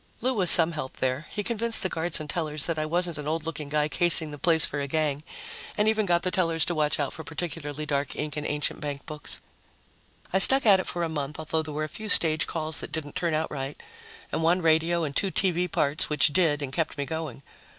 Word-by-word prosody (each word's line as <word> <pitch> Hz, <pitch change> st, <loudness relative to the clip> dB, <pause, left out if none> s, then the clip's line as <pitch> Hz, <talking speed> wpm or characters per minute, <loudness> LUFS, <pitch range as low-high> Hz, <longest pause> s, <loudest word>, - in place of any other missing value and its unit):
Lou 255 Hz, +3 st, -1 dB
was 190 Hz, -7 st, +7 dB
some 165 Hz, -1 st, +10 dB
help 150 Hz, -5 st, -7 dB
there 130 Hz, +4 st, -3 dB
he 210 Hz, -, -5 dB
convinced 230 Hz, +1 st, -1 dB
the -, -, 0 dB
guards 165 Hz, -2 st, -3 dB
and 155 Hz, -, -8 dB
tellers 155 Hz, -2 st, -4 dB
that 165 Hz, -2 st, -3 dB
I 155 Hz, -, -3 dB
wasn't 170 Hz, -1 st, -2 dB
an 150 Hz, -, -7 dB
old 160 Hz, +1 st, -3 dB
looking 155 Hz, -3 st, -6 dB
guy 150 Hz, 0 st, 0 dB
casing 160 Hz, 0 st, +1 dB
the 145 Hz, -, -10 dB
place 160 Hz, +2 st, +8 dB
for 145 Hz, -, -5 dB
a 140 Hz, -, -4 dB
gang, 150 Hz, -1 st, -2 dB, 0.6 s
and 210 Hz, +1 st, +1 dB
even 220 Hz, -1 st, 0 dB
got 175 Hz, -1 st, +1 dB
the 185 Hz, -, -1 dB
tellers 165 Hz, -4 st, 0 dB
to 175 Hz, -, -2 dB
watch 150 Hz, -2 st, -1 dB
out 140 Hz, -2 st, -3 dB
for 160 Hz, -, -8 dB
particularly 155 Hz, -2 st, -6 dB
dark 140 Hz, -2 st, -3 dB
ink 150 Hz, -1 st, -5 dB
in 150 Hz, -, -5 dB
ancient 150 Hz, +1 st, -3 dB
bankbooks. 150 Hz, +1 st, -7 dB, 0.9 s
I 190 Hz, -, +2 dB
stuck 270 Hz, +6 st, +7 dB
at 200 Hz, -3 st, +5 dB
it 185 Hz, -, -5 dB
for 175 Hz, -, -4 dB
a -, -, -1 dB
month, 150 Hz, -2 st, -5 dB
although 160 Hz, 0 st, -3 dB
there 155 Hz, -1 st, -9 dB
were 155 Hz, -, -3 dB
a -, -, -3 dB
few 215 Hz, +7 st, -9 dB
stage 160 Hz, -4 st, +4 dB
calls 155 Hz, -2 st, -5 dB
that -, -, -8 dB
didn't 150 Hz, -3 st, -6 dB
turn 170 Hz, -3 st, -2 dB
out 160 Hz, +1 st, -3 dB
right, 135 Hz, 0 st, -6 dB, 0.5 s
and -, -, -3 dB
one 170 Hz, +2 st, +1 dB
radio 165 Hz, +1 st, +1 dB
and 145 Hz, -2 st, -5 dB
two 195 Hz, -, 0 dB
TV 180 Hz, -2 st, -1 dB
parts, 150 Hz, +4 st, 0 dB
which 150 Hz, -1 st, +2 dB
did 150 Hz, -4 st, +1 dB
and 135 Hz, -1 st, -7 dB
kept 160 Hz, -2 st, -3 dB
me 140 Hz, -, -3 dB
going. 155 Hz, -4 st, -7 dB
160 Hz, 240 wpm, -25 LUFS, 150-175 Hz, 0.9 s, some